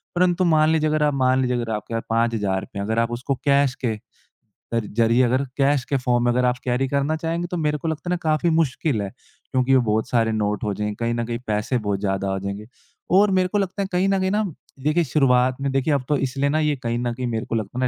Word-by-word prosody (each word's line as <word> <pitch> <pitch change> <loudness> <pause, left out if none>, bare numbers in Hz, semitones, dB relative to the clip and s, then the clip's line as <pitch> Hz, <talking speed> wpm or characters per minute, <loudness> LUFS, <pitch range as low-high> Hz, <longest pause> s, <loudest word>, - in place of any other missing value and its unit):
परंतु 180 0 +2
मान 155 -2 +4
लीजिए 155 -1 +2
अगर 155 0 +1
आप 145 -1 +2
मान 130 +1 +3
लीजिए 125 -1 0
अगर 115 -2 -3
आपके 105 +2 -6
पास 115 - -2
5,000 110 -4 -1
है 100 - -2
अगर 110 +1 0
आप 115 0 0
उसको 125 +3 -2
कैश 140 -2 +3
के 110 -2 0 0.8
कर 115 -2 0
ज़रिए 115 +2 +4
अगर 130 +3 +2
कैश 140 -1 +2
के 140 - +2
फ़ॉर्म 120 -1 +1
में 120 - +3
अगर 125 +1 +1
आप 125 0 +1
कैरी 125 +2 0
करना 140 +3 0
चाहेंगे 165 +2 -2
तो 180 - -2
मेरे 150 -1 0
को 165 - -5
लगता 160 +2 -3
है - - +1
ना - - 0
काफ़ी 155 +3 +2
मुश्किल 140 -5 0
है। 100 - -3 0.4
क्योंकि 130 +1 +3
वो 130 - +5
बहुत 110 +1 0
सारे 115 -2 +2
नोट 105 +2 -1
हो 105 -1 -1
जाएँगे, 105 +1 -3
कहीं 115 0 -1
न 120 0 -2
कहीं 120 0 -4
पैसे 105 +4 0
बहुत 100 -3 -2
ज़्यादा 95 -1 -1
हो 95 - -2
जाएँगे। 100 +2 -5 0.5
और 205 0 +5
मेरे 185 -1 +2
को 205 - -1
लगता 195 0 -1
है 195 - -1
कहीं 180 +2 +2
न 195 -1 +2
कहीं 190 0 0
न 210 -6 -1 0.3
देखिए 155 +3 +2
शुरुआत 130 -3 +3
में 140 -1 -1
देखिए 135 +3 +1
अब 140 - 0
तो 145 - +3
इसलिए 135 +2 -1
ना 155 +2 +1
ये 150 -1 +1
कहीं 120 0 -1
न 120 -1 -1
कहीं 125 +1 -4
मेरे 115 0 -2
को 115 - -3
लगता 110 +3 -3
है 130 - +2
130 Hz, 260 wpm, -22 LUFS, 115-155 Hz, 0.8 s, वो